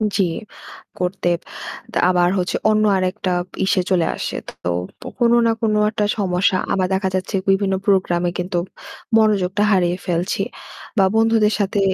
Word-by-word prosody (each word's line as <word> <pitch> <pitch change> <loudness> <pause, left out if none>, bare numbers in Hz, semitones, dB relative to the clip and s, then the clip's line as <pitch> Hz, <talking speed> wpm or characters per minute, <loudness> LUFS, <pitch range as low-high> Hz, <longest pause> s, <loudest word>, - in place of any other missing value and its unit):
জি। 195 - +3 0.8
করতে 180 0 -2 0.7
তা - - -1
আবার 175 -1 +3
হচ্ছে 180 0 -1
অন্য 215 0 +3
আরেকটা 185 0 -1 0.3
ইসে 190 -1 +2
চলে 175 -3 +3
আসে। - - -4 0.3
তো 90 +1 -4
কোনো 235 0 +4
না 230 - +4
কোনো 215 -1 +1
একটা 210 -2 0
সমস্যা, 185 -1 +1 0.2
আবার 185 -1 +1
দেখা 190 0 0
যাচ্ছে 185 +2 -2
বিভিন্ন 195 0 +2
program-এ 180 -3 +2
কিন্তু 180 0 -2 0.6
মনোযোগটা 205 -2 +2
হারিয়ে 180 -2 +2
ফেলছি 175 +1 -1 0.6
বা 195 - +5
বন্ধুদের 225 -1 +3
সাথে 200 0 0
190 Hz, 140 wpm, -20 LUFS, 180-210 Hz, 0.8 s, বা